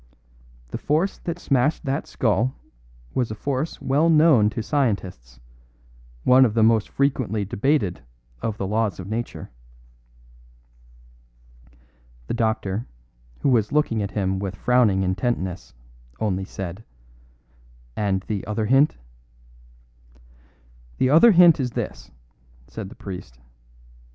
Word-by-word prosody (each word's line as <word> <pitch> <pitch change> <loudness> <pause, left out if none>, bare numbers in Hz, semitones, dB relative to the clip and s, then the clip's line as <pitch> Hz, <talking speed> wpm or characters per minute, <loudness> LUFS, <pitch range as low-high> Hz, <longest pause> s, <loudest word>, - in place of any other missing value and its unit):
The - - -5
force 160 +7 0
that 170 -1 -4
smashed 145 -1 0
that 140 +2 -2
skull 115 +3 0 0.6
was 125 -3 0
a 110 - -5
force 140 +7 -3
well 145 +5 +2
known 150 -9 +5
to 110 - -4
scientists 95 - -2 0.8
one 130 +1 +6
of 115 -4 +1
the 115 - +4
most 110 -1 +3
frequently 130 -7 0
debated 100 - 0 0.4
of 110 -2 -3
the 100 - -3
laws 105 0 -1
of 95 - -6
nature." 115 +3 -5 2.7
The - - -4
doctor, 110 -2 -1 0.5
who - - +2
was 115 -5 +2
looking 145 -7 +1
at 100 - -2
him 95 -2 -1
with 100 -1 -4
frowning 110 -4 +2
intentness, 95 - -2 0.4
only 95 -3 -1
said: 95 +1 -7 1.1
"And 100 -2 0
the 105 -2 -4
other 110 0 -1
hint?" 135 +6 +3 2.0
"The 130 - +2
other 165 +10 +7
hint 175 -4 +6
is 125 -3 -2
this," - - -5 0.6
said 105 - -8
the - - -13
priest. 95 - -9
110 Hz, 120 wpm, -23 LUFS, 100-135 Hz, 2.7 s, other